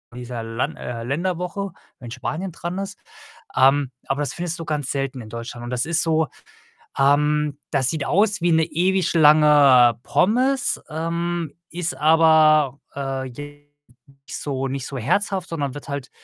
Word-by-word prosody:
dieser 120 -2 -6
Lan 115 +2 -3
äh, 115 -2 -6
Länderwoche, 180 +7 -3 0.3
wenn 120 -3 -9
Spanien 160 +8 -4
dran 175 +3 -5
ist. 195 +1 -5 0.6
Ähm, 135 0 +4 0.2
aber 135 +2 -1
das 140 - -2
findest 170 -1 -4
du 165 - -6
ganz 145 -3 -2
selten 135 -2 -3
in 110 - -11
Deutschland 115 +1 -7
und 120 - -6
das 125 0 -1
ist 170 +1 +2
so, 160 -1 +1 0.7
ähm 150 +1 +2
das 135 -3 +2
sieht 155 -4 -2
aus 205 0 +2
wie 175 0 +2
'ne 160 0 +4
ewig 180 +3 0
lange 145 -7 +6
Pommes, 255 +6 +1
ähm, 165 0 -3 0.2
ist 175 0 -3
aber, 155 -3 +4 0.2
äh, 135 -1 -3
jetzt 145 +3 -11 0.6
nicht - - -5
so 135 -2 -3
nicht 135 0 -4
so 140 - -6
herzhaft, 185 - 0
sondern 145 -5 -3
wird 145 - -9
halt, 140 -3 -5
150 Hz, 160 wpm, -22 LUFS, 135-170 Hz, 0.7 s, lange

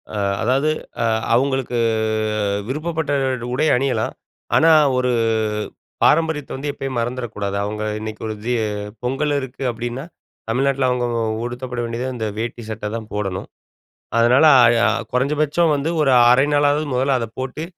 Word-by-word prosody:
அ - - -2 0.2
அதாது, 135 +6 +2 0.3
அ - - +2 0.3
அவுங்களுக்கு 130 0 +1 0.9
விருப்பப்பட்ட 155 +2 -2 0.3
டு - - -5
உடை 150 +5 +1
அணியலாம். 135 +1 0 0.4
ஆனா, 165 +1 +5 0.3
ஒரு 125 0 +1 0.9
பாரம்பரியத்த 160 -3 +2
வந்து 140 +2 -4
எப்பயும் 135 -3 -4
மறந்துற 120 +2 -2
கூடாது. 100 -1 -3
அவங்க 105 +1 -3 0.2
இன்னைக்கு 110 0 -7
ஒரு 110 - -4
ஜீ 120 - 0 0.5
பொங்கல் 135 +4 0
இருக்கு 135 0 -7
அப்டீன்னா, 120 +3 -5 0.5
தமிழ்நாட்டுல 135 +2 +1
அவங்க 125 -1 0 0.2
உ - - 0 0.2
உடுத்தப்பட 125 0 -5
வேண்டியது 115 +2 -3
அந்த 115 -3 -3
வேட்டி 120 +1 -4
சட்ட 105 -1 -4
தான் 110 -2 -6
போடணும். 95 -3 -3 0.7
அதனால 125 +6 +5 0.4
அ - - +5 0.2
கொறஞ்சபட்சம் 150 +5 +1
வந்து 145 +3 -1
ஒரு 135 -3 +3 0.2
1/2 135 +3 +5
நாளாது 145 +1 +3
முதல்ல 130 +1 +2
அத 115 - -3
போட்டு 130 +4 -4
130 Hz, 140 wpm, -20 LUFS, 120-140 Hz, 0.9 s, ஆனா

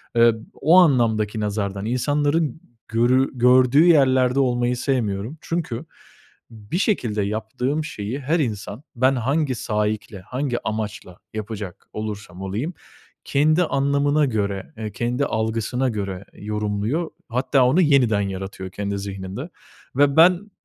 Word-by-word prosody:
Eee, 115 -1 +6 0.2
o 165 +6 +4
anlamdaki 115 - +3
nazardan 100 -1 -2
insanların 145 +4 0 0.3
görü 125 +4 +2
gördüğü 125 +4 +5
yerlerde 130 -5 +4
olmayı 125 -1 +1
sevmiyorum. 120 0 -1
Çünkü 160 -5 -3 0.7
bir 110 +8 -5
şekilde 120 - 0
yaptığım 110 +8 -2
şeyi 120 -3 -5
her 155 +5 0
insan 110 0 -3
ben 130 +2 +3
hangi 135 +2 0
saikle, 105 -2 -2
hangi 125 +4 -3
amaçla 105 -4 -4 0.2
yapacak 105 -4 -6
olursam 105 -4 -6
olayım 110 - -3 0.5
kendi 155 +5 +3
anlamına 140 +1 +2
göre, 100 -6 -2
eee, 110 -2 -5
kendi 120 +6 -1
algısına 115 +3 -1
göre 100 -3 -4
yorumluyor. 105 +9 -2 0.2
Hatta 130 +2 +2
onu 160 +9 +4
yeniden 125 -9 +3
yaratıyor 95 -1 -5
kendi 100 0 -3
zihninde 100 - -6 0.5
ve 140 0 +3
ben, 180 +5 +5
120 Hz, 120 wpm, -22 LUFS, 105-140 Hz, 0.7 s, Eee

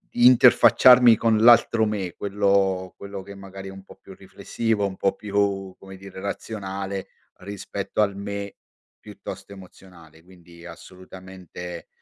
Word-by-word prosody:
di 120 - +3
interfacciarmi 125 -1 +6
con 115 -1 +1
l'altro 115 -1 +4
me, 100 -5 -4
quello 100 -2 -1
quello 100 -1 -8
che 100 - -11
magari 95 0 -10
è - - -9
un 95 0 -13
po' - - -16
più 95 - -15
riflessivo, 105 +2 -3
un 95 -1 -9
po' 95 - 0
più, 100 -2 -2
come 95 0 -12
dire, 95 0 -12
razionale 100 -1 -6 0.3
rispetto 100 +1 -5
al 100 -2 0
me 100 0 -7 0.4
piuttosto - - -11
emozionale, 85 -4 -17
quindi 85 -2 -18
assolutamente, 90 0 -11
95 Hz, 135 wpm, -23 LUFS, 95-100 Hz, 0.4 s, interfacciarmi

